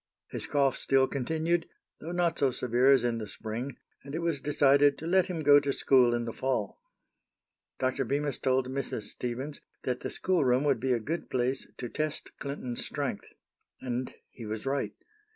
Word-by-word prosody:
His -, -, -2 dB
cough 140 Hz, -3 st, +2 dB
still 135 Hz, -1 st, +3 dB
continued, 160 Hz, +6 st, -1 dB, 0.3 s
though 165 Hz, -, -6 dB
not 175 Hz, -1 st, +1 dB
so 140 Hz, -, +4 dB
severe 125 Hz, +1 st, +2 dB
as 135 Hz, -3 st, +6 dB
in 120 Hz, -1 st, 0 dB
the 110 Hz, -, -5 dB
spring, 115 Hz, +7 st, -4 dB, 0.3 s
and 140 Hz, +2 st, -7 dB
it 170 Hz, -, -2 dB
was 165 Hz, -5 st, 0 dB
decided 145 Hz, 0 st, +4 dB
to 160 Hz, -, -8 dB
let 185 Hz, +2 st, +3 dB
him 170 Hz, -4 st, -3 dB
go 145 Hz, 0 st, +8 dB
to 140 Hz, -1 st, -1 dB
school 125 Hz, -3 st, +4 dB
in 120 Hz, 0 st, -2 dB
the 115 Hz, -, -4 dB
fall. 130 Hz, -6 st, -2 dB, 1.0 s
Dr. 130 Hz, +1 st, 0 dB
Bemis 140 Hz, +2 st, -1 dB
told 130 Hz, -1 st, +1 dB
Mrs. 130 Hz, -4 st, -3 dB
Stevens 130 Hz, +7 st, -4 dB, 0.2 s
that 125 Hz, -1 st, -1 dB
the -, -, -4 dB
schoolroom 140 Hz, -8 st, +2 dB
would 140 Hz, -5 st, +2 dB
be 130 Hz, +2 st, 0 dB
a 120 Hz, -, +1 dB
good 160 Hz, +10 st, -4 dB
place 130 Hz, +1 st, -1 dB
to 125 Hz, -, -4 dB
test 155 Hz, +4 st, -3 dB
Clinton's 135 Hz, -4 st, -4 dB
strength. 140 Hz, -8 st, -3 dB, 0.5 s
And 125 Hz, 0 st, -3 dB, 0.2 s
he 115 Hz, -, -9 dB
was 110 Hz, +2 st, -4 dB
right. 135 Hz, 0 st, -1 dB
135 Hz, 180 wpm, -29 LUFS, 125-145 Hz, 1.0 s, go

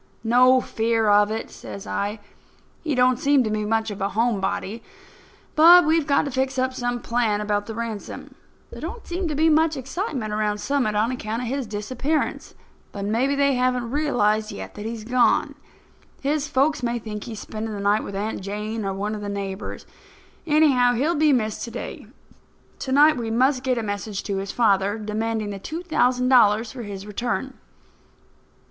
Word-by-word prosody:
"No 250 Hz, +3 st, +5 dB
fear 225 Hz, -2 st, 0 dB
of 205 Hz, 0 st, +5 dB
it," 220 Hz, +1 st, -4 dB
says 200 Hz, +1 st, -9 dB
I. 205 Hz, +1 st, -3 dB, 0.6 s
"He 305 Hz, -4 st, -1 dB
don't 250 Hz, 0 st, +3 dB
seem 280 Hz, -1 st, +3 dB
to 215 Hz, -, -2 dB
be 215 Hz, 0 st, -1 dB
much 220 Hz, 0 st, 0 dB
of 200 Hz, -, -7 dB
a 195 Hz, -, 0 dB
home 225 Hz, -1 st, 0 dB
body. 210 Hz, +3 st, -3 dB, 0.7 s
But 340 Hz, +3 st, +8 dB
we've 315 Hz, -1 st, +2 dB
got 280 Hz, -, +3 dB
to 280 Hz, -, -4 dB
fix 265 Hz, +1 st, -1 dB
up 260 Hz, 0 st, 0 dB
some 245 Hz, -1 st, -2 dB
plan 230 Hz, -4 st, 0 dB
about 205 Hz, -1 st, -1 dB
the 225 Hz, -, -6 dB
ransom. 230 Hz, -3 st, -6 dB, 0.4 s
There -, -, -9 dB
don't 475 Hz, -, -6 dB
seem 350 Hz, +1 st, -3 dB
to 305 Hz, -, -2 dB
be 315 Hz, +3 st, +3 dB
much 315 Hz, -1 st, +3 dB
excitement 265 Hz, -, -4 dB
around 210 Hz, -1 st, 0 dB
Summit 250 Hz, -1 st, 0 dB
on 220 Hz, +4 st, +1 dB
account 230 Hz, -1 st, -4 dB
of -, -, -4 dB
his 270 Hz, -2 st, -2 dB
disappearance; 255 Hz, +9 st, -2 dB, 0.4 s
but 200 Hz, -1 st, -5 dB
maybe 245 Hz, +7 st, +1 dB
they 280 Hz, 0 st, +3 dB
haven't 250 Hz, -2 st, 0 dB
realized 220 Hz, -8 st, +1 dB
yet 95 Hz, -1 st, -8 dB
that 210 Hz, +1 st, -6 dB
he's 225 Hz, -1 st, -5 dB
gone. 245 Hz, +2 st, +2 dB, 0.7 s
His 290 Hz, +1 st, -1 dB
folks 290 Hz, +1 st, +1 dB
may 240 Hz, -1 st, -1 dB
think 210 Hz, -2 st, -6 dB
he's 225 Hz, -3 st, -7 dB
spending 220 Hz, 0 st, -5 dB
the -, -, -5 dB
night 205 Hz, +2 st, +2 dB
with 200 Hz, -, -7 dB
Aunt 210 Hz, +2 st, -3 dB
Jane 210 Hz, +3 st, -4 dB
or 195 Hz, -1 st, -2 dB
one 205 Hz, +2 st, -2 dB
of 210 Hz, -, -5 dB
the 205 Hz, -, -4 dB
neighbours. 200 Hz, -1 st, -5 dB, 0.6 s
Anyhow, 285 Hz, -5 st, +4 dB
he'll 290 Hz, +8 st, +1 dB
be 305 Hz, -1 st, +3 dB
missed 220 Hz, -5 st, 0 dB
to -, -, -7 dB
day. -, -, -7 dB, 0.7 s
To 260 Hz, -, -4 dB
night 295 Hz, +2 st, +5 dB
we 230 Hz, -2 st, -3 dB
must 255 Hz, +3 st, +2 dB
get 255 Hz, -1 st, 0 dB
a 230 Hz, -, -1 dB
message 205 Hz, -1 st, -4 dB
to 200 Hz, -1 st, -3 dB
his 195 Hz, 0 st, -4 dB
father 205 Hz, -3 st, +2 dB
demanding 215 Hz, 0 st, -2 dB
the 200 Hz, -, -6 dB
two 320 Hz, -, -6 dB
thousand 250 Hz, -7 st, +1 dB
dollars 225 Hz, -3 st, +4 dB
for 255 Hz, -, -8 dB
his 200 Hz, -3 st, -7 dB
return." 240 Hz, +5 st, -3 dB
230 Hz, 190 wpm, -23 LUFS, 210-265 Hz, 0.7 s, But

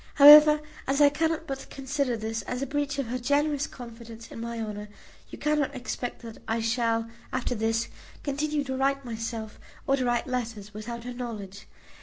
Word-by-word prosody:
However, 300 Hz, +1 st, +10 dB, 0.3 s
as 275 Hz, +2 st, +1 dB
I 290 Hz, -1 st, +8 dB
cannot 320 Hz, +2 st, 0 dB
but 270 Hz, -2 st, -6 dB
consider 275 Hz, -2 st, -1 dB
this 225 Hz, +1 st, -3 dB
as 250 Hz, +2 st, -3 dB
a -, -, 0 dB
breach 285 Hz, +1 st, -2 dB
of 275 Hz, -, -1 dB
her 250 Hz, +2 st, -3 dB
generous 285 Hz, +3 st, +1 dB
confidence 230 Hz, -2 st, -10 dB
in 230 Hz, -, -7 dB
my 235 Hz, 0 st, -4 dB
honour, 210 Hz, -1 st, -5 dB, 0.4 s
you -, -, -9 dB
cannot 300 Hz, -2 st, 0 dB
expect 245 Hz, -1 st, -5 dB
that 225 Hz, -1 st, -9 dB
I 225 Hz, +1 st, 0 dB
shall, 230 Hz, 0 st, +1 dB, 0.2 s
after 255 Hz, -1 st, -1 dB
this, 225 Hz, +1 st, 0 dB, 0.4 s
continue 295 Hz, +1 st, -1 dB
to 265 Hz, -1 st, -3 dB
write 275 Hz, +1 st, +1 dB
myself 225 Hz, -2 st, -5 dB, 0.3 s
or 275 Hz, -, +3 dB
to 255 Hz, -, 0 dB
receive 240 Hz, -1 st, +1 dB
letters, 225 Hz, -5 st, -4 dB
without 230 Hz, +3 st, -6 dB
her 250 Hz, +1 st, -5 dB
knowledge. 210 Hz, -5 st, -7 dB
245 Hz, 180 wpm, -27 LUFS, 225-280 Hz, 0.4 s, However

